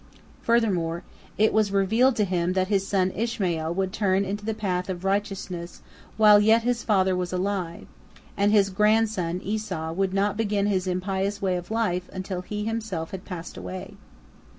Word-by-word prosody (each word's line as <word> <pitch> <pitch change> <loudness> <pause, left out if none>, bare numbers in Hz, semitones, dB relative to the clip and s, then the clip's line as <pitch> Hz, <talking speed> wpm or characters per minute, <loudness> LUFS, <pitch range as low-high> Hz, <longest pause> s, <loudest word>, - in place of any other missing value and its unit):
Furthermore 185 -8 +1 0.3
it 215 +1 +3
was 215 -2 +2
revealed 220 +6 +3
to 210 - +2
him 180 -1 0
that 185 0 0
his 195 -2 +1
son 190 -2 +1
Ishmael 185 -8 -1
would 190 0 -1
turn 195 -1 +1
into 205 +2 -4
the 220 0 -2
path 180 -3 -2
of 180 -1 -4
righteousness 195 -3 -3 0.3
while 210 -1 +7
yet 220 +2 +4
his 245 0 0
father 190 -3 +2
was 180 -1 -2
alive, 185 -2 -2 0.5
and 205 +1 +2
his 200 -2 +4
grandson 210 -4 +2
Esau 195 -6 -3
would 190 +2 0
not 200 +1 0
begin 205 -2 0
his 190 -2 0
impious 190 +2 -1
way 190 -2 0
of 175 -1 -5
life 200 -5 -1
until 185 -1 -4
he 210 +3 -4
himself 220 -8 -3
had 190 -1 -7
passed 175 -3 -7
away. 90 +1 -7
195 Hz, 170 wpm, -25 LUFS, 180-210 Hz, 0.5 s, while